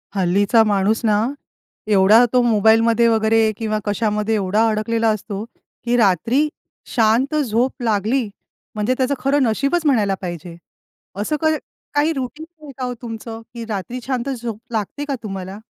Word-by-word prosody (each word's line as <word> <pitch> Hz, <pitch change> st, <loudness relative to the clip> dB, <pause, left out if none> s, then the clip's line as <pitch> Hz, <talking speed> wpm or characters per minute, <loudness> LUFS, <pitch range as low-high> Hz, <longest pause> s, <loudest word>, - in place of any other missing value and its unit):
हल्लीचा 200 Hz, +4 st, +3 dB
माणूस 210 Hz, +1 st, +1 dB
ना 210 Hz, -1 st, +3 dB, 0.7 s
एवढा 205 Hz, +4 st, +6 dB
तो 250 Hz, -, +5 dB
मोबाईलमध्ये 225 Hz, +1 st, +4 dB
वगैरे 220 Hz, 0 st, +3 dB
किंवा 215 Hz, -1 st, -1 dB
कशामध्ये 210 Hz, +1 st, 0 dB
एवढा 210 Hz, +2 st, +1 dB
अडकलेला 225 Hz, +1 st, 0 dB
असतो, 210 Hz, -1 st, -3 dB, 0.4 s
की 240 Hz, 0 st, +1 dB
रात्री 230 Hz, -, +2 dB, 0.5 s
शांत 235 Hz, +6 st, +2 dB
झोप 255 Hz, -3 st, 0 dB
लागली 220 Hz, +2 st, 0 dB, 0.5 s
म्हणजे 215 Hz, +4 st, 0 dB
त्याचं 260 Hz, +1 st, +1 dB
खरं 275 Hz, +1 st, +2 dB
नशीबच 275 Hz, +8 st, 0 dB
म्हणायला 215 Hz, -9 st, +2 dB
पाहिजे. 175 Hz, -2 st, -6 dB, 0.7 s
असं 305 Hz, +9 st, -1 dB
क 315 Hz, 0 st, +3 dB, 0.4 s
काही 295 Hz, +2 st, +3 dB
रूटीन 275 Hz, +3 st, -5 dB, 0.2 s
आहे 290 Hz, -, -9 dB
का 255 Hz, -, -3 dB
हो 250 Hz, -, -3 dB
तुमचं 225 Hz, -1 st, -7 dB
की 235 Hz, -1 st, -6 dB
रात्री 215 Hz, +4 st, -4 dB
शांत 260 Hz, 0 st, -2 dB
झोप 235 Hz, -5 st, -5 dB
लागते 225 Hz, +6 st, -3 dB
का 280 Hz, -2 st, -2 dB
तुम्हाला? 195 Hz, -2 st, -6 dB
225 Hz, 145 wpm, -20 LUFS, 210-250 Hz, 0.7 s, एवढा